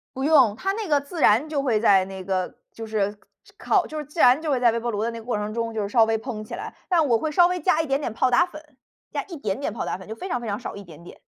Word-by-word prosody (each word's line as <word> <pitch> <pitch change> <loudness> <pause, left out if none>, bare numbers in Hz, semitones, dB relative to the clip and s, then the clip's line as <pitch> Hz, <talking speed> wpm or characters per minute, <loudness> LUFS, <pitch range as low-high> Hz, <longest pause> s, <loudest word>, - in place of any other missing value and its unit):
不 265 - -3
用， 285 -8 +5
它 385 - -2
那 430 0 -4
个 295 -3 +3
自 285 +4 -7
然 235 +7 +4
就 300 -2 -1
会 245 -6 +1
在 195 -4 +4
那 190 0 -8
个 185 -1 -2 0.2
就 225 - -8
是 205 -1 -1 0.4
烤 380 -4 +2
就 310 - -7
是 300 - -4
自 300 +5 -10
然 255 +3 +6
就 320 - -3
会 265 - +1
在 240 -2 +4
微 230 - -1
波 235 +1 -3
炉 210 -1 -2
的 230 - -1
那 230 - -7
个 225 - -13
过 240 -3 -1
程 210 +1 -4
中 230 0 -3
就 215 -2 -2
稍 225 +2 +4
微 225 0 +1
蓬 220 -2 -6
起 - - -7
来。 - - -7
但 340 -4 +3
我 235 -3 +3
会 310 +7 -3
稍 345 +3 +5
微 360 0 -2
加 325 -1 +2
一 - - -4
点 275 0 +1
点 285 - -3
泡 255 +3 +2
打 340 +8 +5
粉， 305 -5 -14 0.3
加 - - -2
一 345 -4 -8
点 210 -5 -3
点 280 - -2
泡 225 - -4
打 - - -3
粉， 190 - -13
就 220 - -6
非 370 - -7
常 245 - -1
非 235 - -6
常 205 -1 -2
少， 245 - -7
一 200 - -9
点 170 -3 -14
点。 175 - -13
240 Hz, 345 characters per minute, -24 LUFS, 215-305 Hz, 0.4 s, 然